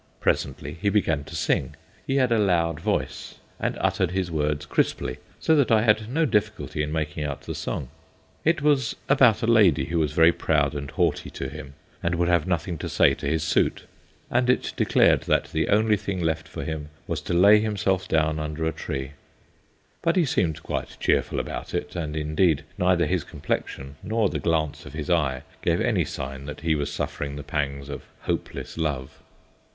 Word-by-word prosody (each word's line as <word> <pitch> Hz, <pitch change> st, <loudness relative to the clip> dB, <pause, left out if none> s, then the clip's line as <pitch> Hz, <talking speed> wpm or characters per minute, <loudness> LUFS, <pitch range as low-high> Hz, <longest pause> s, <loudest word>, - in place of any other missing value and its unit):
Presently -, -, -1 dB
he 100 Hz, -, +2 dB
began 80 Hz, -8 st, +1 dB
to 80 Hz, -, -9 dB
sing. 65 Hz, -3 st, 0 dB, 0.3 s
He 135 Hz, -, 0 dB
had 130 Hz, -3 st, +3 dB
a 115 Hz, -, +4 dB
loud 85 Hz, -5 st, +2 dB
voice -, -, -2 dB, 0.2 s
and -, -, -1 dB
uttered 95 Hz, -3 st, +1 dB
his 90 Hz, -1 st, -2 dB
words 75 Hz, -1 st, -1 dB
crisply, 65 Hz, -4 st, 0 dB, 0.2 s
so 160 Hz, -, +3 dB
that 140 Hz, -4 st, +3 dB
I 110 Hz, -1 st, +5 dB
had 110 Hz, -1 st, +2 dB
no 160 Hz, +6 st, +2 dB
difficulty 105 Hz, -, -1 dB
in 75 Hz, 0 st, -2 dB
making 75 Hz, -1 st, -2 dB
out 70 Hz, -1 st, -4 dB
the -, -, -5 dB
song. 65 Hz, -, -4 dB, 0.5 s
It 160 Hz, -2 st, +2 dB
was 140 Hz, -6 st, +2 dB
about 125 Hz, -6 st, +5 dB
a -, -, +3 dB
lady 105 Hz, -, +5 dB
who 85 Hz, +3 st, -1 dB
was 75 Hz, -3 st, 0 dB
very 80 Hz, +1 st, +6 dB
proud 75 Hz, -4 st, +1 dB
and 70 Hz, -1 st, -5 dB
haughty -, -, 0 dB
to 65 Hz, -, -5 dB
him 70 Hz, -1 st, -9 dB, 0.3 s
and 85 Hz, +1 st, 0 dB
would 85 Hz, +1 st, +1 dB
have 85 Hz, -1 st, +2 dB
nothing 85 Hz, -2 st, -1 dB
to -, -, -4 dB
say -, -, +4 dB
to -, -, -5 dB
his 80 Hz, +1 st, 0 dB
suit, 80 Hz, -, +1 dB, 0.5 s
and 125 Hz, +1 st, +2 dB
it 125 Hz, -, +1 dB
declared -, -, +4 dB
that -, -, +1 dB
the 80 Hz, -, 0 dB
only 105 Hz, +1 st, +4 dB
thing 100 Hz, -2 st, -3 dB
left 80 Hz, -2 st, -1 dB
for -, -, -6 dB
him 75 Hz, -2 st, -4 dB, 0.2 s
was 80 Hz, -3 st, -3 dB
to 85 Hz, -, -2 dB
lay 100 Hz, +4 st, +7 dB
himself 100 Hz, -3 st, 0 dB
down 80 Hz, -1 st, +1 dB
under 75 Hz, +1 st, -3 dB
a 80 Hz, -, +1 dB
tree. 65 Hz, -3 st, -5 dB, 0.9 s
But 165 Hz, -, +2 dB
he 180 Hz, -3 st, +4 dB
seemed 80 Hz, -, 0 dB
quite -, -, -4 dB
cheerful -, -, +1 dB
about -, -, -5 dB
it, 75 Hz, -, -3 dB
and 80 Hz, -3 st, -3 dB
indeed 75 Hz, 0 st, +2 dB
neither 90 Hz, -1 st, +3 dB
his -, -, 0 dB
complexion 70 Hz, +1 st, -4 dB
nor 110 Hz, -1 st, +1 dB
the -, -, -3 dB
glance 80 Hz, -3 st, 0 dB
of -, -, -10 dB
his 80 Hz, +2 st, -3 dB
eye 70 Hz, -7 st, +1 dB, 0.2 s
gave -, -, +1 dB
any -, -, +1 dB
sign 65 Hz, +1 st, -6 dB
that 75 Hz, 0 st, -7 dB
he 80 Hz, 0 st, +2 dB
was 75 Hz, -1 st, -2 dB
suffering 70 Hz, -1 st, -3 dB
the 70 Hz, -, -6 dB
pangs 70 Hz, -1 st, -3 dB
of 70 Hz, -1 st, -7 dB, 0.2 s
hopeless -, -, -4 dB
love. 70 Hz, -5 st, -3 dB
80 Hz, 195 wpm, -25 LUFS, 75-100 Hz, 0.9 s, lay